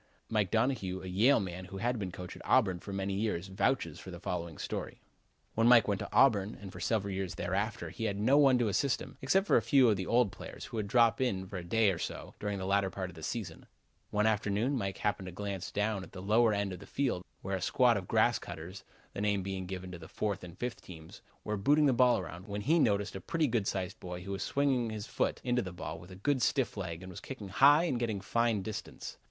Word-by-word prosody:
Mike 105 -4 +1
Donohue, 110 -5 0
a - - -6
Yale 110 +10 +4
man 95 -2 -5
who 95 - -8
had 120 +3 -1
been 95 -3 -3
coach 90 0 -8
at - - -11
Auburn 95 -9 +3
for 100 - -8
many 100 0 -2
years, 95 -3 -2
vouches 95 - 0
for - - -10
the - - -8
following 85 -3 -4
story: - - -5 0.5
When 115 +1 +3
Mike 120 -3 +7
went 100 -2 0
to - - -6
Auburn 110 -6 +4
and 95 -2 -9
for 90 - -10
several 100 +1 0
years 95 -2 -3
thereafter 100 +6 -2
he 115 - -4
had 100 -2 -1
no 120 +7 +4
one 140 -3 +6
to 120 -2 +1
assist 125 +6 +1
him, - - -10
except 190 +9 +2
a - - +6
few 135 -4 +5
of 105 - +2
the 95 - -4
old 120 -4 +3
players, - - -9
who - - -7
would 105 -2 -1
drop 115 +2 +4
in 95 -7 0
for 95 0 -7
a 90 - -5
day 105 +3 +3
or 85 - -4
so - - -5
during 105 -1 -2
the 95 - -4
latter 100 0 +2
part 95 -1 -5
of - - -17
the 80 - -10
season. 110 +4 -5 0.4
One 105 0 +1
afternoon 110 +4 +1
Mike 100 -6 -2
happened 100 -2 -1
to - - -6
glance 100 0 -5
down 105 -1 0
at 90 - -11
the 95 - -7
lower 110 +3 +4
end 100 -2 -1
of 90 - -7
the - - -12
field 125 -10 -1 0.2
where 95 +1 -1
a 95 - -4
squad 125 -2 +4
of 95 -3 -3
grass 115 +1 +3
cutters 85 +3 -8 0.3
(the - - -4
name 100 -2 +1
given 95 -1 -5
to 90 - -8
the 80 - -10
fourth 100 0 -3
and 85 -2 -10
fifth 120 -1 -4
teams) 80 -3 -12 0.2
were 105 0 -2
booting 145 +9 +4
the 135 - +4
ball 125 -1 +5
around, 90 +4 -7
when 100 0 -4
he 160 +10 +3
noticed 105 -7 +1
a 95 - -5
pretty 165 - 0
good 115 -6 0
sized 95 -2 -3
boy 90 0 -6
who 100 - -6
was 95 - -3
swinging 135 -4 +1
his 110 -1 -5
foot - - -1
into 125 0 +1
the 95 - -6
ball 85 -2 -6
with 85 +2 -13
a 95 - -10
good 130 +7 0
stiff 135 0 +1
leg 90 -3 -5
and 95 - -8
was 90 - -8
kicking 110 -7 -7
high 140 - +6
and 130 -9 0
getting 110 -4 -1
fine 115 +1 +1
distance. 110 +1 -6
100 Hz, 250 wpm, -32 LUFS, 95-120 Hz, 0.5 s, Mike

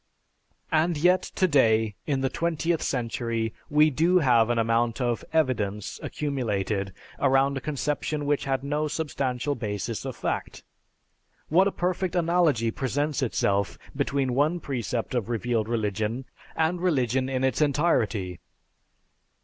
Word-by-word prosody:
And 160 +1 +2
yet 180 +4 +4
today, 115 - +2
in 140 -3 0
the 135 - +1
twentieth 170 +2 -1
century, 115 -2 -2 0.2
we 150 0 +5
do 165 +6 +3
have 120 -8 +4
an 120 - +1
amount 115 +1 +1
of 120 -2 -1
"evidence" 110 -10 0
accumulated 105 -9 -2 0.3
around 135 +1 +3
a 135 - -3
conception 150 +2 -2
which 145 0 0
had 135 -1 -1
no 150 +2 -1
substantial 145 -3 -2
basis 105 -7 -4
of - - -5
fact. - - -4 0.9
What 185 +5 +5
a - - 0
perfect 180 0 -1
analogy 165 -9 +2
presents 140 +4 -1
itself 100 -5 0 0.2
between 140 -2 0
one 150 +7 +2
precept 125 -5 -3
of 120 -4 -1
revealed 115 -1 -1
religion 110 +2 -1 0.3
and 165 +2 0
religion 130 -7 +1
in 130 -1 -1
its 130 +3 +1
entirety. 115 - +1
135 Hz, 130 wpm, -26 LUFS, 115-155 Hz, 0.9 s, we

